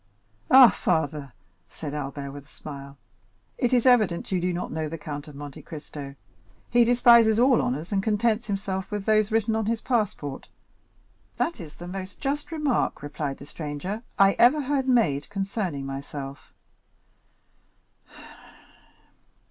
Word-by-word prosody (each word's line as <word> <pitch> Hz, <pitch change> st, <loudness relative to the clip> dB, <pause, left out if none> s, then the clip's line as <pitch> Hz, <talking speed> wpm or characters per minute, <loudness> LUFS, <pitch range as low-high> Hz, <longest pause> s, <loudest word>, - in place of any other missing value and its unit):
"Ah, 260 Hz, -4 st, +9 dB
father," 145 Hz, -5 st, -1 dB, 0.4 s
said 150 Hz, -3 st, -7 dB
Albert 140 Hz, -1 st, -5 dB
with 140 Hz, 0 st, -10 dB
a -, -, -25 dB
smile, 140 Hz, -2 st, -10 dB, 0.6 s
"it 245 Hz, -4 st, +1 dB
is 245 Hz, -1 st, +3 dB
evident 215 Hz, -10 st, +3 dB
you 185 Hz, -2 st, +1 dB
do 180 Hz, +1 st, 0 dB
not 175 Hz, +1 st, -4 dB
know 155 Hz, 0 st, -3 dB
the 165 Hz, -, -5 dB
Count 145 Hz, -1 st, -7 dB
of 150 Hz, -, -11 dB
Monte 145 Hz, -1 st, -8 dB
Cristo; 145 Hz, -3 st, -9 dB, 0.6 s
he 240 Hz, 0 st, +6 dB
despises 235 Hz, -2 st, +6 dB
all 250 Hz, +1 st, +5 dB
honors, 150 Hz, -, -3 dB
and 195 Hz, -1 st, +1 dB
contents 220 Hz, +2 st, +1 dB
himself 195 Hz, -2 st, -3 dB
with 205 Hz, -2 st, -4 dB
those 215 Hz, 0 st, +3 dB
written 220 Hz, 0 st, +1 dB
on 220 Hz, -1 st, -1 dB
his 230 Hz, 0 st, 0 dB
passport." 205 Hz, -, -2 dB, 0.9 s
"That 340 Hz, -, -1 dB
is 155 Hz, -3 st, -10 dB
the 175 Hz, -, -9 dB
most 190 Hz, +1 st, -7 dB
just 290 Hz, +3 st, -3 dB
remark," 300 Hz, -, 0 dB
replied 145 Hz, -1 st, -4 dB
the 140 Hz, -, -11 dB
stranger, 155 Hz, +8 st, -5 dB, 0.2 s
"I 195 Hz, 0 st, +6 dB
ever 260 Hz, +6 st, +6 dB
heard 275 Hz, -1 st, -1 dB
made 215 Hz, -, +2 dB
concerning 195 Hz, -7 st, -3 dB
myself." 135 Hz, 0 st, -7 dB
190 Hz, 145 wpm, -26 LUFS, 145-230 Hz, 0.9 s, Ah